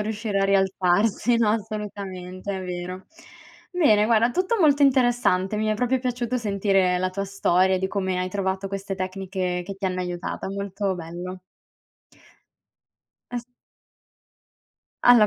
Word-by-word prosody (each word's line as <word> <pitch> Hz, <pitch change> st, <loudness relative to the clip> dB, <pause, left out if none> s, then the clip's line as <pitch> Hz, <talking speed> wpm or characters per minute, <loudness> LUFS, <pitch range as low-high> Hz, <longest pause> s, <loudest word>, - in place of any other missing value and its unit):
riuscire 210 Hz, -1 st, -2 dB
a -, -, +3 dB
rialzarsi, 195 Hz, +4 st, +2 dB
no, 230 Hz, -2 st, +3 dB
assolutamente, 200 Hz, -3 st, -4 dB
è 190 Hz, -, -5 dB
vero. 180 Hz, +1 st, -5 dB, 0.7 s
Bene, 255 Hz, -13 st, +4 dB
guarda, 230 Hz, +1 st, +4 dB
tutto 370 Hz, -, 0 dB
molto 290 Hz, -3 st, +5 dB
interessante. 245 Hz, -7 st, +3 dB
Mi 215 Hz, -, 0 dB
è 215 Hz, -, +2 dB
proprio 250 Hz, +4 st, +1 dB
piaciuto 250 Hz, -1 st, -2 dB
sentire 195 Hz, -4 st, +2 dB
la 185 Hz, +1 st, 0 dB
tua 195 Hz, +2 st, -3 dB
storia 190 Hz, -1 st, +2 dB
di 190 Hz, -, 0 dB
come 190 Hz, -2 st, -1 dB
hai 185 Hz, 0 st, -1 dB
trovato 190 Hz, 0 st, -2 dB
queste 195 Hz, 0 st, -4 dB
tecniche 185 Hz, -1 st, -3 dB
che 195 Hz, +2 st, -6 dB
ti 195 Hz, -, -7 dB
hanno 185 Hz, -1 st, -2 dB
aiutata. 175 Hz, +1 st, -4 dB
Molto 200 Hz, 0 st, -2 dB
bello. 180 Hz, +2 st, -7 dB, 1.9 s
As 245 Hz, -1 st, -4 dB, 1.6 s
Alla 240 Hz, -3 st, +8 dB
195 Hz, 135 wpm, -24 LUFS, 185-220 Hz, 1.9 s, Alla